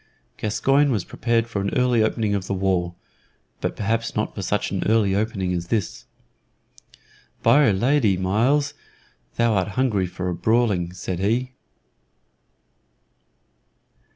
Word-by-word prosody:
Gascoyne 135 Hz, +7 st, +2 dB
was 105 Hz, -7 st, -1 dB
prepared 115 Hz, 0 st, 0 dB
for 115 Hz, -4 st, -3 dB
an 100 Hz, -, -2 dB
early 125 Hz, -2 st, +3 dB
opening 110 Hz, -1 st, 0 dB
of 100 Hz, -1 st, -2 dB
the 100 Hz, -, -1 dB
war, 90 Hz, -2 st, 0 dB, 0.6 s
but -, -, -3 dB
perhaps 115 Hz, +3 st, -2 dB
not 105 Hz, -, -1 dB
for 100 Hz, -, -6 dB
such 105 Hz, +3 st, -1 dB
an 95 Hz, -, -2 dB
early 105 Hz, -3 st, +3 dB
opening 100 Hz, -3 st, -1 dB
as 85 Hz, -1 st, -3 dB
this. 105 Hz, -4 st, -2 dB, 1.4 s
"By 145 Hz, -1 st, +5 dB
'r -, -, +4 dB
Lady, 115 Hz, -1 st, +2 dB
Myles, 115 Hz, +10 st, +1 dB, 0.6 s
thou 115 Hz, -1 st, +2 dB
art 95 Hz, -3 st, +1 dB
hungry 110 Hz, -8 st, +1 dB
for 90 Hz, 0 st, -4 dB
brawling," 105 Hz, -4 st, +1 dB
said 90 Hz, 0 st, -5 dB
he. 120 Hz, +6 st, 0 dB
105 Hz, 130 wpm, -23 LUFS, 95-115 Hz, 1.4 s, By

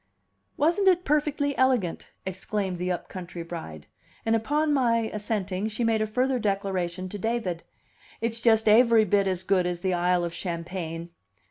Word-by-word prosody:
"Wasn't 345 Hz, +7 st, +2 dB
it 360 Hz, -1 st, +4 dB
perfectly 290 Hz, -1 st, +1 dB
elegant!" 250 Hz, -10 st, +1 dB, 0.2 s
exclaimed 190 Hz, 0 st, -3 dB
the 180 Hz, +1 st, -1 dB
up 175 Hz, -, -3 dB
country 175 Hz, -2 st, -7 dB
bride. 80 Hz, -, -8 dB, 0.4 s
And 225 Hz, 0 st, +3 dB
upon 295 Hz, +7 st, +1 dB
my 230 Hz, -4 st, +2 dB
assenting, 205 Hz, -2 st, -2 dB
she 220 Hz, +2 st, -3 dB
made 225 Hz, -1 st, +2 dB
a 215 Hz, -, 0 dB
further 255 Hz, +4 st, +1 dB
declaration 190 Hz, -3 st, -1 dB
to 205 Hz, -, -6 dB
David: 220 Hz, -6 st, -2 dB, 0.6 s
"It's 230 Hz, 0 st, -2 dB
just 220 Hz, -2 st, +4 dB
aivry 225 Hz, 0 st, +6 dB
bit 200 Hz, 0 st, +2 dB
as 185 Hz, -1 st, -1 dB
good 185 Hz, -2 st, +2 dB
as 175 Hz, -1 st, -3 dB
the 190 Hz, -1 st, 0 dB
Isle 175 Hz, 0 st, +2 dB
of 170 Hz, -1 st, -3 dB
Champagne." 170 Hz, -1 st, -5 dB
205 Hz, 160 wpm, -26 LUFS, 180-235 Hz, 0.6 s, aivry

